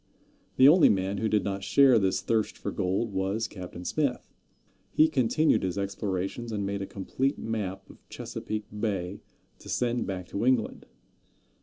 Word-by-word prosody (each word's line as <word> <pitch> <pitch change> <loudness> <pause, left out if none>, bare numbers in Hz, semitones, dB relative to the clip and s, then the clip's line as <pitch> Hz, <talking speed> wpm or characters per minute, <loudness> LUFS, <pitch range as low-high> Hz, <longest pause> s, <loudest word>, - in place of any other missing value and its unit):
The 130 - +7
only 165 +4 +7
man 95 0 0
who 110 - 0
did 105 -2 +2
not 95 0 -3
share 130 +4 +5
this 95 -2 +1
thirst 110 -2 0
for - - -4
gold 95 +4 -1
was 95 +4 -1
Captain 90 -2 -9
Smith. 140 0 -1 0.6
He 155 +10 +4
continued 155 +2 +2
his 95 0 -2
explorations, 100 +3 -3
and 100 -2 -2
made 100 0 -3
a 95 - -4
complete 130 +8 -2
map 95 -4 -4
of - - -16
Chesapeake 110 -1 -5
Bay 100 -3 -2 0.4
to - - -12
send 120 0 0
back 95 -2 -4
to 100 - -3
England. 125 -3 +1
105 Hz, 160 wpm, -28 LUFS, 95-120 Hz, 0.6 s, The